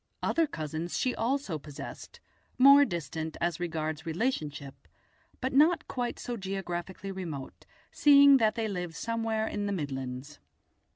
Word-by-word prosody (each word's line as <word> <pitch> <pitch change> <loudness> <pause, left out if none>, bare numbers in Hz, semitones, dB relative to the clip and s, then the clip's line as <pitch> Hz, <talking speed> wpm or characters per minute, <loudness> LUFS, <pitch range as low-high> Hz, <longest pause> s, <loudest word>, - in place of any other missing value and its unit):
Other 330 -1 +2
cousins 160 - -4
she 255 - 0
also 230 - -1
possessed, 145 0 -9 0.4
more 280 +2 +8
distant 160 - -4
as 170 -1 -1
regards 160 -2 -3
relationship, 160 - -3 0.5
but 260 +1 -2
not 310 +5 +4
quite 245 -2 -3
so 240 -1 -5
geographically 190 -1 -5
remote, 165 -8 -7 0.2
seeing 280 -1 +7
that 220 -3 +2
they 225 -2 -1
lived 180 -5 -4
somewhere 225 +1 -1
in 205 -1 -3
the - - -1
Midlands. 135 -4 -5
190 Hz, 130 wpm, -29 LUFS, 155-245 Hz, 0.5 s, more